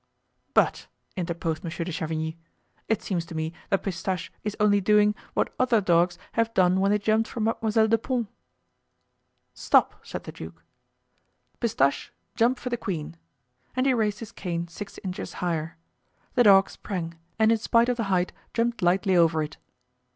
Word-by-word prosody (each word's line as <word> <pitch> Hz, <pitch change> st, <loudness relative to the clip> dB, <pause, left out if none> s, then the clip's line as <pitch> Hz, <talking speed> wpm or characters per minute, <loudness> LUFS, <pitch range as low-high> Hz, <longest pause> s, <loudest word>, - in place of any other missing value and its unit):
"But," -, -, +2 dB, 0.3 s
interposed 170 Hz, -3 st, -3 dB
Monsieur 170 Hz, 0 st, -4 dB
de 180 Hz, -, -4 dB
Chavigny, 160 Hz, 0 st, -3 dB, 0.5 s
"it 220 Hz, -, 0 dB
seems 175 Hz, -4 st, -1 dB
to 165 Hz, -, -8 dB
me 160 Hz, +1 st, -2 dB, 0.2 s
that 195 Hz, -, +1 dB
Pistache 185 Hz, -1 st, -3 dB
is 210 Hz, -1 st, -3 dB
only 205 Hz, -1 st, +4 dB
doing 210 Hz, +1 st, +4 dB, 0.2 s
what -, -, 0 dB
other 250 Hz, -3 st, +4 dB
dogs 175 Hz, -2 st, +2 dB
have 230 Hz, 0 st, +1 dB
done 185 Hz, 0 st, +4 dB
when 195 Hz, +1 st, +3 dB
they 210 Hz, -, +4 dB
jumped 220 Hz, +2 st, +1 dB
for -, -, -6 dB
Mademoiselle 220 Hz, 0 st, +2 dB
de 225 Hz, +1 st, +3 dB
Pons." 245 Hz, 0 st, -1 dB, 1.3 s
"Stop," -, -, +2 dB
said -, -, -6 dB
the -, -, -7 dB
duke, -, -, -10 dB, 1.0 s
"Pistache, 140 Hz, -, +1 dB, 0.2 s
jump 245 Hz, +2 st, +2 dB
for 250 Hz, -, -5 dB
the 240 Hz, -, 0 dB
queen." 165 Hz, -7 st, -4 dB, 0.6 s
And 255 Hz, +1 st, +1 dB
he 270 Hz, -, +4 dB
raised 215 Hz, -3 st, 0 dB
his 225 Hz, -, -7 dB
cane 170 Hz, -2 st, -4 dB
six 195 Hz, +4 st, -9 dB
inches 185 Hz, -1 st, -5 dB
higher. 165 Hz, -3 st, -3 dB, 0.6 s
The 245 Hz, -2 st, +4 dB
dog 195 Hz, -1 st, +7 dB
sprang, 170 Hz, -4 st, -5 dB, 0.2 s
and 220 Hz, 0 st, +4 dB
in 225 Hz, -, +3 dB
spite 230 Hz, +2 st, +3 dB
of 250 Hz, -1 st, 0 dB
the 230 Hz, -, -1 dB
height 185 Hz, -2 st, +1 dB, 0.2 s
jumped 230 Hz, -1 st, 0 dB
lightly 185 Hz, +2 st, +3 dB
over 165 Hz, -2 st, +4 dB
it. 150 Hz, -, -7 dB
195 Hz, 165 wpm, -26 LUFS, 170-225 Hz, 1.3 s, dog